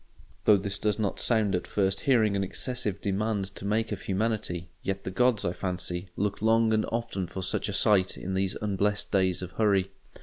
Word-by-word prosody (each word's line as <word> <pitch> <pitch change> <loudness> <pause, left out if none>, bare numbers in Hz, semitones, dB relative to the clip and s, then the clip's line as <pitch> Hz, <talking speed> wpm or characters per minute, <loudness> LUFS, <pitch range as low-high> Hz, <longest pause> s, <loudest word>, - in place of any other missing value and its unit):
Though 105 - +7
this 100 0 -3
does 105 -1 +1
not 105 -3 -1
sound 110 -4 +2
at 90 - -1
first 95 -1 +1
hearing 110 -7 +3
an 100 - +1
excessive 105 0 -3
demand 100 -1 -1
to 100 - -8
make 110 +2 0
of 100 - -3
humanity, 95 -4 -2
yet 95 +1 -3
the - - -4
gods, 125 +1 +2
I 85 - 0
fancy, 90 0 -3
look 100 0 -1
long 110 0 +4
and 110 0 +1
often 115 -6 -2
for 95 - -5
such 95 - -1
a - - -3
sight 95 -3 +3
in 95 - -4
these 95 0 0
unblest 105 0 0
days 95 -2 +2
of 90 - -6
hurry. 100 -2 +2
100 Hz, 200 wpm, -28 LUFS, 95-110 Hz, -, Though